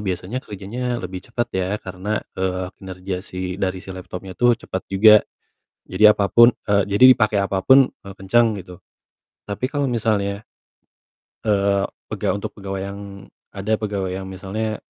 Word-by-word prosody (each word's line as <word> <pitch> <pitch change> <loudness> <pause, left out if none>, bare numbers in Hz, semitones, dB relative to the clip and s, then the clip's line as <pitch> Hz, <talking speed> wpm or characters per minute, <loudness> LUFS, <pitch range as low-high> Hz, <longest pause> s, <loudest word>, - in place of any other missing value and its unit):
biasanya 95 +8 -3
kerjanya 120 +5 -4
lebih 95 -1 -6
cepet, 120 0 -1
ya. 95 -1 -1 0.2
Karena, 95 +3 -3 0.2
eee, 95 0 -2
kinerja 95 0 -5
si 90 +1 -5
dari 95 -1 0
si 95 - -7
laptopnya 95 +1 -8
tuh 120 -1 +5
cepet 95 -4 -5
juga. 105 +3 +7 0.7
Jadi 110 - -2
apapun, 105 +3 +6
e - - -7 0.2
jadi 100 +5 +2
dipakai 110 -4 +2
apapun, 100 +8 +4
e 100 - -19
kenceng, 115 +5 +3 0.2
gitu. 90 -1 -13 0.7
Tapi, 105 +5 -3
kalau 145 -2 0
misalnya 105 -4 -1 1.0
eee, 100 -2 +2 0.2
pega - - -1
untuk 100 - -5
pegawai 95 -2 -5
yang 100 - -9 0.5
ada 100 +2 -4
pegawai 100 -3 -2
yang 95 0 -5
misalnya, 100 +4 -4
100 Hz, 145 wpm, -21 LUFS, 95-110 Hz, 1.0 s, juga